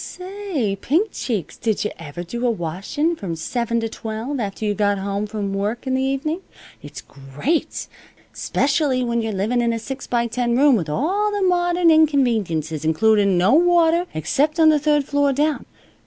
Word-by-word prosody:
"Say, 365 - -4
Pink 365 - +1
Cheeks, 215 - -4
did 220 -3 -1
yuh 210 - -1
ever 165 +1 -7
do 235 +8 -3
a - - +3
washin' 210 - -2
from 185 - -5
seven 235 +7 -2
to 225 - -1
twelve, 225 +5 -5
after 205 0 -4
you 210 - +1
got 205 -1 +1
home 200 +2 -3
from 205 -2 -4
work 210 +6 -2
in 260 - -1
the 260 - +1
evenin'? 275 +6 -1 0.4
It's - - -9
great! 140 - -3 0.5
'Specially 275 -2 0
when 235 -1 0
you're 225 -1 -2
living 215 +5 0
in 235 0 +1
a - - -2
six 265 +4 -7
by 235 -1 +1
ten 235 0 -1
room 280 -1 +5
with 170 -8 -2
all 375 - 0
the 410 -1 -1
modern 350 -1 +3
inconveniences, 220 - +1
includin' 200 +4 +3
no 185 +7 +3
water 345 +1 +4
except 290 - 0
on 320 -1 +7
the 305 -1 +4
third 295 -1 +2
floor 285 0 +1
down. 295 +2 0
240 Hz, 180 wpm, -21 LUFS, 205-305 Hz, 0.5 s, on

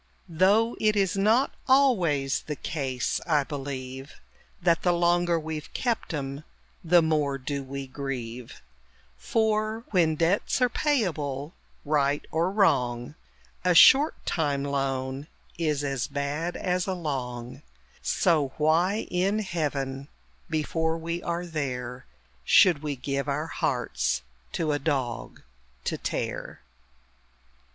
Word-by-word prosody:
Though 200 +8 +3
it 215 -1 +2
is 195 -2 +1
not 220 +7 +3
always 185 - +3
the 150 - -2
case, 135 -5 -2
I 150 -4 +3
believe, 135 -1 -6 0.4
That 170 -1 +2
the 180 - +3
longer 175 0 +2
we've 155 -1 -6
kept 235 -6 -1
'em, 140 -1 -4 0.4
the 170 0 +5
more 150 -3 +1
do 140 +1 -4
we 135 +1 -6
grieve: 125 - -6 0.5
For, 215 - 0
when 165 -5 +3
debts 170 +10 +1
are 250 -1 +3
payable, 160 - -1 0.3
right 145 -1 +1
or 165 +3 +1
wrong, 125 - +1 0.5
A 180 -1 +3
short 275 - +8
time 145 -5 0
loan 135 0 -2 0.3
is 150 -3 0
as 135 -3 -1
bad 145 +4 -3
as 180 0 -1
a 190 - -1
long 130 -5 -4 0.4
So 150 -7 +1
why 170 +7 +2
in 190 +4 +1
Heaven 140 -8 -2 0.4
(before 160 +1 0
we 170 +1 -4
are 175 0 -3
there!) 125 -6 -4 0.4
Should 165 - +5
we 150 -2 -3
give 140 +2 -3
our 145 +3 -1
hearts - - -1 0.3
to 155 -2 0
a 145 - 0
dog 135 -5 -3 0.4
to - - -1
tear? - - -4
155 Hz, 120 wpm, -27 LUFS, 135-180 Hz, 0.5 s, short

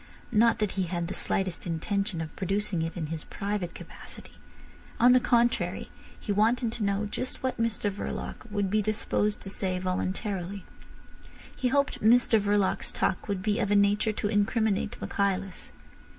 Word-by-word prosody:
Not 230 +1 +4
that 210 -3 0
he 190 -1 -1
had 170 -1 -2
the 185 - -4
slightest 185 -3 -1
intention 180 +2 -1
of 160 - -6
producing 195 -2 -1
it 165 +2 -3
in 165 - -2
his 160 - -4
private 200 -3 -3
capacity. - - -11 0.7
On 245 +2 +7
the 255 - +7
contrary, 240 -1 +1 0.3
he 210 - -3
wanted 225 +3 +2
to 230 - -4
know 200 +1 +1
just 250 +6 -4
what 260 -3 -1
Mr 215 -2 0
Verloc 205 +4 -6
would 205 -2 -1
be 215 +1 +3
disposed 210 0 0
to 195 - -7
say 185 -2 -1
voluntarily. 185 +1 -3 0.9
He 255 - 0
hoped 280 +2 +1
Mr 230 0 +5
Verloc's 205 -1 +1
talk 185 - -1
would 200 -2 -2
be 210 0 +1
of 205 - 0
a 205 - +3
nature 205 +2 +3
to 210 - -2
incriminate 210 0 +1
Michaelis. 195 -2 -2
205 Hz, 165 wpm, -28 LUFS, 190-220 Hz, 0.9 s, On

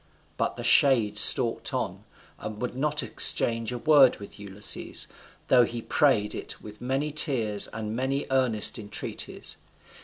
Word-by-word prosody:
But - - -3
the - - -8
shade 115 -7 +3
stalked 115 +2 +3
on, - - -5 0.3
and 110 -1 -8
would 125 +1 -5
not 150 +2 0
exchange 115 0 +4
a 125 - -5
word 140 -1 +4
with 100 0 -13
Ulysses, 100 0 -3 0.4
though 125 -1 +5
he 120 0 -4
prayed 115 -4 0
it - - -8
with 105 0 -13
many 135 +4 -2
tears 120 -9 0
and 110 0 -6
many 135 +3 -2
earnest 125 -5 +1
entreaties. 105 -2 -6
120 Hz, 145 wpm, -25 LUFS, 105-135 Hz, 0.4 s, though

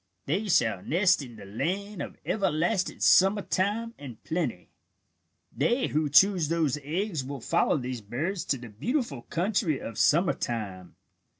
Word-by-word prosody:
They 190 +9 -1
shall 110 - +2
nest 175 - +2
in 125 -4 -9
the 105 - -11
land 185 - -3
of - - -7
everlasting 185 0 0
summer 195 +2 +5
time 215 +5 -1
and 130 -6 -9
plenty. 155 - -3 0.8
"They 235 - +1
who 150 0 0
choose 175 +3 +5
those 160 -4 +1
eggs 165 +1 -2
will 140 +1 -6
follow - - +1
these 125 -3 -4
birds 155 - -3
to 140 - 0
the 120 -1 -10
beautiful 155 - -2
country 175 - 0
of 115 - -7
summer 170 +4 +4
time. 100 -6 -5
155 Hz, 145 wpm, -28 LUFS, 125-195 Hz, 0.8 s, summer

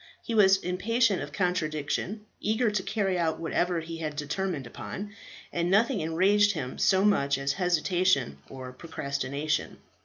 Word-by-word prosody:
He 230 - -4
was 195 -3 +6
impatient 200 +4 +1
of 145 0 -6
contradiction, 180 +4 -2
eager 220 +2 +1
to 205 -2 0
carry 195 -2 -1
out 160 -2 0
whatever 170 +1 0
he 165 +1 -7
had 155 -2 -4
determined 150 0 -3
upon; 205 - -7 0.4
and 170 0 0
nothing 220 +3 +3
enraged 195 +6 +3
him 130 -7 -5
so 190 +1 +4
much 140 -9 +3
as 140 0 -1
hesitation 175 - +1
or 130 -1 -8
procrastination. 140 0 -3
175 Hz, 145 wpm, -28 LUFS, 150-200 Hz, 0.4 s, was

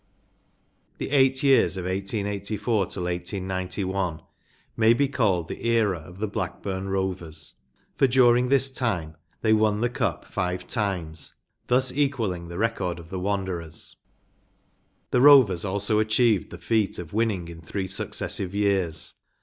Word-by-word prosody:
J - - -3
The - - -7
eight 135 -1 +3
years 135 -7 +4
from 95 - -4
1884 100 +2 -1
till 90 - -4
189 95 +1 -3
t 95 -4 -2 0.6
may 115 +1 +5
be 140 +4 +2
called 100 -11 +1
the - - -7
era 110 -6 +2
of 85 +3 -13
the 110 +2 -2
Rlackburn 95 -1 -4
Rovers, 95 -5 -3 0.4
for 135 - +5
during 125 -1 +4
this 135 0 +4
time 90 -12 -2 0.3
they 110 - +3
won 110 -1 +2
the 120 0 +1
Cup - - -2
live 90 -1 -1
times, 90 - -3 0.3
thus 130 +1 +2
equalling 115 -12 -1
the 85 0 -7
record 105 -5 -1
of 85 -1 -12
the 95 - -3
Wanderers, 95 -4 -3 1.2
The 125 - +3
Rovers 130 -11 +7
also 100 +2 +1
achieved 110 -2 +2
the - - -9
feat 110 -3 0
of 85 -1 -8
winning 105 -6 0
in 85 -1 -10
three 95 +4 -4
successive 95 0 -3
years. 95 -6 +1
100 Hz, 145 wpm, -25 LUFS, 90-115 Hz, 1.2 s, Rovers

